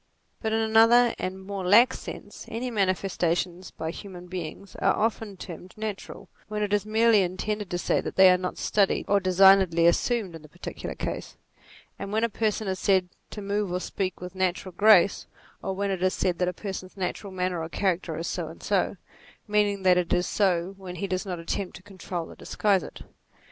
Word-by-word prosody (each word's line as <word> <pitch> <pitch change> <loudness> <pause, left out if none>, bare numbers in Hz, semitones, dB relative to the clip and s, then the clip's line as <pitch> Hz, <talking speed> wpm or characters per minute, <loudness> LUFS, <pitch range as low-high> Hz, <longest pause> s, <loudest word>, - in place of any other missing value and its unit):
But 220 - -1
in 220 - +2
another 225 +2 +5
and 185 +1 -3
a - - -11
more 195 0 -6
lax 230 +8 +5
sense, - - -9
any 240 +3 -3
manifesta 185 -4 +1
tions 180 +1 -4
by 160 0 -5
human 180 -1 -9
beings 180 +1 -7
are - - +2
often 220 -2 -1
termed 180 0 -9
natural, 215 -2 -6 0.2
when 210 0 -2
it 205 0 -1
is 205 0 +1
merely 220 -1 +4
intended 195 +2 -2
to 175 - -2
say - - +1
that - - -6
they 190 -1 +8
are 180 - +4
not 180 0 -4
studied 200 -2 +1
or 200 - +4
designedly 185 -2 +5
assumed 200 +2 +2
in 165 - -9
the 155 - -15
particular 175 +4 -7
case; - - -5 0.6
as 200 - -5
when 220 +2 0
a 230 - +2
person 215 -1 -1
is 190 -1 -2
said 190 -2 +2 0.2
to 210 - -7
move 200 -1 -1
or 180 - -1
speak 185 0 -3
with 180 0 -8
natural 185 0 -1
grace; 205 -3 +6
60 - - -12 0.3
NATURE - - -9
or 190 - 0
when 200 +1 -1
it 190 -2 -3
is 185 0 +2
said 180 -2 0
that 180 - +1
a - - +1
person's 190 -1 -7
natural 190 +2 -4
manner 180 -2 -2
or 160 - -5
character 180 -3 -1
is 165 - -4
so 170 -2 -3
and 160 - -11
so; 200 -1 0 0.5
meaning 205 -2 +1
that 180 -1 +5
it 175 - -3
is 180 0 +2
so 185 -2 +1
when 185 -2 -8
he 180 - -3
does 185 +1 -3
not 180 -2 -3
attempt 180 +3 -4
to 180 - -12
control 185 -4 -6
or - - -12
disguise 200 -3 +1
it. - - -10
190 Hz, 210 wpm, -26 LUFS, 180-205 Hz, 0.6 s, they